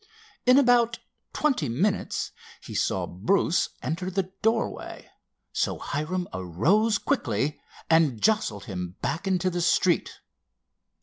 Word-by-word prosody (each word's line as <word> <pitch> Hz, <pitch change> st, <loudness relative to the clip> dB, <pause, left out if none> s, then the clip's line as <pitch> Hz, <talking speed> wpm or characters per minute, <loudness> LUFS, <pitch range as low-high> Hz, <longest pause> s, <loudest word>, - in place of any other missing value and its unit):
In 255 Hz, +1 st, +7 dB
about 245 Hz, -4 st, +4 dB, 0.3 s
twenty 295 Hz, -, 0 dB
minutes 180 Hz, -, -1 dB, 0.3 s
he -, -, -9 dB
saw -, -, 0 dB
Bruce 160 Hz, -, +1 dB
enter 180 Hz, +4 st, -2 dB
the 190 Hz, 0 st, -2 dB
doorway, 225 Hz, +1 st, -1 dB, 0.5 s
so -, -, 0 dB
Hiram 175 Hz, +5 st, -3 dB
arose 150 Hz, -, +2 dB
quickly 125 Hz, -, -1 dB, 0.3 s
and 160 Hz, -8 st, +3 dB
jostled 210 Hz, -, +1 dB
him 90 Hz, -2 st, -5 dB
back 165 Hz, +8 st, -2 dB
into 185 Hz, -1 st, +1 dB
the 175 Hz, 0 st, -2 dB
street. 175 Hz, +1 st, +2 dB
180 Hz, 115 wpm, -26 LUFS, 135-210 Hz, 0.5 s, In